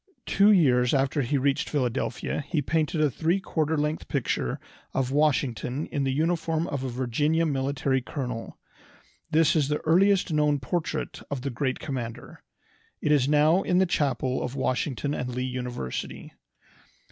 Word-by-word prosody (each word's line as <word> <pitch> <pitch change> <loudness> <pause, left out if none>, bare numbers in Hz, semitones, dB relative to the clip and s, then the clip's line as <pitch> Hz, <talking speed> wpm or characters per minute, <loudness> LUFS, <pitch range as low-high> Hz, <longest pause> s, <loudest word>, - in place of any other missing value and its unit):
Two 200 +2 +5
years 125 -9 +4
after 135 +2 +1
he 140 +3 0
reached 140 +1 0
Philadelphia 130 0 -2
he 155 - 0
painted 155 +2 0
a 150 -2 +3
three 170 +8 +1
quarter 160 -4 -1
length 150 +2 -2
picture 120 - -1 0.4
of 130 -1 0
Washington 140 -2 0
in 140 -1 -1
the 135 - +1
uniform 165 +2 0
of 140 -5 -3
a 130 - -2
Virginian 145 +6 0
military 135 -1 0
colonel. 125 -3 -5 0.7
This 160 +1 +3
is 150 -4 +2
the 150 +1 0
earliest 185 +2 +3
known 150 -1 +2
portrait 160 +6 -3
of 140 -3 -3
the 140 - -2
great 130 +1 -1
commander. 125 -6 -6 0.6
It 150 - 0
is 140 -2 +3
now 155 +5 +4
in 180 - +1
the 190 - +5
chapel 135 -6 0
of 125 - -4
Washington 135 +2 -1
and 125 -3 -3
Lee 125 - -1
University. 125 - -5
145 Hz, 155 wpm, -26 LUFS, 130-155 Hz, 0.7 s, Two